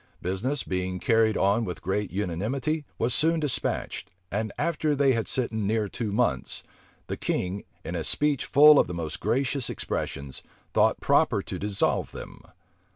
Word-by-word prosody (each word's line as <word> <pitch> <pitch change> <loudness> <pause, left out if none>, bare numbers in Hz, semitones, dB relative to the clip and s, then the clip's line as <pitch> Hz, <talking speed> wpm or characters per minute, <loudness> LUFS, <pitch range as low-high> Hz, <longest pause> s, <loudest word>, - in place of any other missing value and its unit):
Business, 110 +11 -1
being 90 0 -2
carried 110 0 +3
on 100 +4 +2
with 90 -5 -5
great 95 +2 -1
unanimity, 110 - -2
was 115 +1 +1
soon 165 +4 +2
despatched; 150 -5 -2 0.2
and 110 +1 -1
after 155 -1 0
they 140 -1 +4
had 115 -3 0
sitten 110 -5 -1
near 110 0 +1
two 110 +1 -4
months, 120 +4 0 0.4
the - - -4
king, 95 +2 -2 0.2
in - - -4
a - - -2
speech 150 -2 +1
full 150 +1 +7
of - - +3
the 90 - -5
most 80 -3 -4
gracious 135 0 0
expressions, 70 -1 -4 0.3
thought - - +3
proper - - +3
to - - -6
dissolve 100 -1 0
them. - - -9
110 Hz, 155 wpm, -27 LUFS, 95-140 Hz, 0.4 s, full